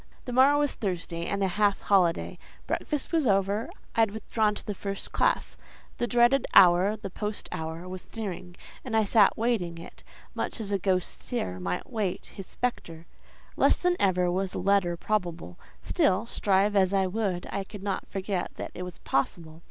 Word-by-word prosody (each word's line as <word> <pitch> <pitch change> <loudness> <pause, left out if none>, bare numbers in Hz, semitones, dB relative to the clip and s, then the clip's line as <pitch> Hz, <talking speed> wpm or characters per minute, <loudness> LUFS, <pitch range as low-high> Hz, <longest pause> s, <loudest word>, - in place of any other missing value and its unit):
The 250 - -5
morrow 270 +3 +6
was 290 -1 +1
Thursday 170 -4 -3
and 200 0 -1
a - - +3
half 205 +1 +1
holiday. 180 -4 +2 0.3
Breakfast 295 -3 -2
was 320 -5 +2
over; 200 +2 +1 0.3
I - - -1
had 225 -1 +5
withdrawn 215 0 0
to - - -9
the 210 - -3
first 195 0 -5
classe. - - 0 0.4
The 240 - 0
dreaded 240 +2 +3
hour, 185 +3 +7
the 195 -2 -7
post 210 +2 -3
hour, 160 +2 -5
was 185 0 -7
nearing, 185 -5 -5 0.3
and 230 -3 -1
I 220 - +4
sat 205 0 +4
waiting 215 -8 0
it, 165 - -11 0.3
much - - -3
as 205 -2 -4
a 200 - +1
ghost 185 -1 -1
seer 90 - -3
might 90 0 -3
wait 210 -7 -2
his 195 - -8
spectre. 170 -9 -4 0.5
Less - - +4
than 360 0 +1
ever 180 -2 +2
was 190 +1 -2
a - - -2
letter 185 -3 +2
probable; 175 - -3 0.2
still, 190 +4 +2
strive 205 -2 +2
as 190 -1 +3
I 190 -1 +3
would, 185 -2 -2
I 200 - -2
could 200 0 -10
not 200 -2 -3
forget 195 -1 -3
that - - -6
it - - -7
was 180 -1 -7
possible. 160 +3 -2
195 Hz, 185 wpm, -27 LUFS, 180-220 Hz, 0.5 s, hour